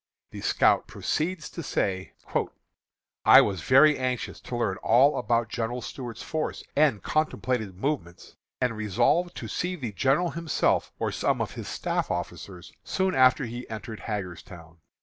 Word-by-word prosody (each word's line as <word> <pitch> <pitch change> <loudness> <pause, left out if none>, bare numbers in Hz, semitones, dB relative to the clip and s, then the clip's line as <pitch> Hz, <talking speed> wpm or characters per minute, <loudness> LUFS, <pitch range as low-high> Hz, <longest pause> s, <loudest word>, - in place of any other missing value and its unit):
The - - -8
scout - - +3
proceeds 165 0 -2
to 170 - -6
say: 95 - -2 1.1
"I - - +9
was 95 -4 -1
very 140 - +5
anxious 130 -2 -3
to 125 - -6
learn 100 -5 0
all 130 +6 +4
about 120 -1 +1
General 120 +1 -3
Stuart's 120 -3 -7
force 155 -1 -3
and 140 -10 +3
contemplated 125 -9 -1
movements, 105 - -4 0.2
and 125 -3 0
resolved 120 - +1
to - - -5
see 180 +1 -2
the 125 -10 -5
general 135 - +1
himself 165 -1 0
or - - -1
some - - 0
of - - -2
his - - -7
staff - - -2
officers, 90 -3 -6
soon 190 0 0
after 130 +1 +4
he 120 +2 -7
entered 110 0 -7
Hagerstown. 90 -5 -7
120 Hz, 150 wpm, -27 LUFS, 105-150 Hz, 1.1 s, I